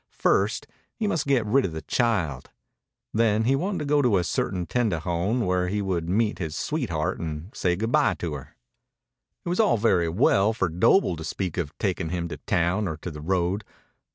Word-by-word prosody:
First, - - +2 0.3
he 225 - -2
must 165 -8 0
get 130 -5 +2
rid 130 +6 +3
of 85 - -2
the 80 - -6
child. 95 - 0 0.6
Then 110 -1 +2
he 130 +4 +3
wanted 185 +7 -1
to 150 - -3
go 145 0 +3
to 120 -7 +3
a 90 - +1
certain 90 0 -1
tendejon 100 +1 0
where 90 0 +1
he 105 +3 -1
would 90 -4 -2
meet 105 +3 +1
his 80 -4 -4
sweetheart 95 - -2
and 80 +4 -6
say 90 -1 +1
good 110 +5 -2
bye 150 +1 +3
to 85 -3 -4
her. 70 -3 -9 0.9
It - - -2
was 180 - -1
all 210 - +4
very 95 -6 +2
well 95 +4 +3
for 95 -5 0
Doble 90 - +3
to 80 - -6
speak 90 +1 -3
of 75 -3 -4
taking 95 -4 -1
him 85 0 -2
to - - -6
town 90 +4 0
or 80 -3 -4
to 85 +3 -6
the 75 -1 -8
road. 90 +4 0
95 Hz, 200 wpm, -25 LUFS, 85-115 Hz, 0.9 s, all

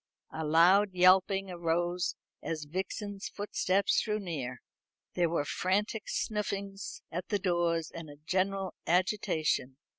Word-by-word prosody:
A 160 - -4
loud 180 +6 +5
yelping 190 +1 +4
arose 175 +1 0 0.3
as 155 -2 -3
Vixen's 195 +5 -4
footsteps 200 -1 +1
drew 210 -1 -1
near. 155 -11 -4 0.6
Then - - -3
there 170 - +4
were 160 -3 0
frantic 205 +7 -1
snuffings 200 -2 -3
under 180 +3 -3
the 205 - +2
doors, 175 -4 0
and 165 -2 -7
a 145 - -10
general 190 +5 -1
agitation. 165 -7 +1
185 Hz, 125 wpm, -31 LUFS, 165-195 Hz, 0.6 s, loud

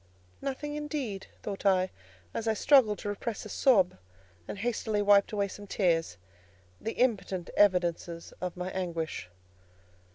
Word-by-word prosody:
"Nothing, 295 +2 -3
indeed," 290 -9 -4 0.2
thought 200 -2 -5
I, 185 -2 +3 0.4
as 225 - -3
I 220 - +2
struggled 225 -4 +5
to 205 - -4
repress 210 +1 -4
a - - -7
sob, 195 - +3 0.5
and - - -5
hastily 220 -1 -1
wiped 205 -1 +5
away 200 -2 0
some 205 +1 -10
tears, 165 - +1 0.6
the 225 - -3
impotent 195 -7 0
evidences 175 -3 +2
of 180 -1 -3
my 180 +1 -3
anguish. 165 - -3
200 Hz, 135 wpm, -30 LUFS, 180-225 Hz, 0.6 s, struggled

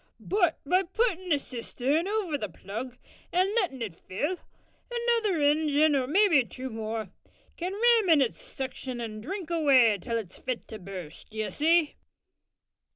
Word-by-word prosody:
But 360 -5 +1
by 365 +6 +3
puttin' 375 -1 -1
the 295 - +4
cistern 275 +5 -2
over 405 -7 -1
the 210 -8 -3
plug 225 +8 -7 0.3
an' 370 +3 +2
lettin' 350 - 0
it 205 -6 -5
fill, 290 - -3 0.5
another 470 -6 +1
ingin 300 0 +3
or 260 -2 +1
mabbe 310 - +4
two 255 +6 -6
more, 220 -2 -4 0.4
can 360 +2 -3
ram 455 -2 +4
in 320 -3 +7
its 260 -4 0
suction 260 -2 -6
and 215 -2 -5
drink 350 - -5
away 260 -10 +5
till 230 +5 -2
it's 210 -6 -7
fit 255 -2 -4
to 220 - -7
burst, 180 -4 -9
d'ye 220 -1 -3
see." 320 0 +2
290 Hz, 155 wpm, -28 LUFS, 230-370 Hz, 0.5 s, in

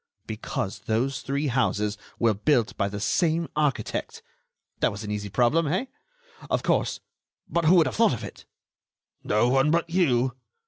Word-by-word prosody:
"Because 105 -2 -4
those 130 +4 0
three 140 +2 -2
houses 110 -5 0 0.2
were 115 -2 +3
built 115 +2 +1
by 100 -1 0
the 100 0 -5
same 165 - +1
architect. 150 -3 -1 0.6
That - - +3
was 100 +2 -7
an 105 - -5
easy 105 -1 -3
problem, 130 - +2
eh? 185 - 0 0.6
Of - - 0
course... - - 0 0.5
but 170 -1 0
who 170 +4 +6
would 165 -3 +6
have 125 -7 -3
thought - - +4
of - - -8
it?" - - -9 0.8
"No 105 +3 +2
one 135 +3 +3
but 170 +1 +1
you." 130 -8 +2
130 Hz, 165 wpm, -26 LUFS, 105-155 Hz, 0.8 s, who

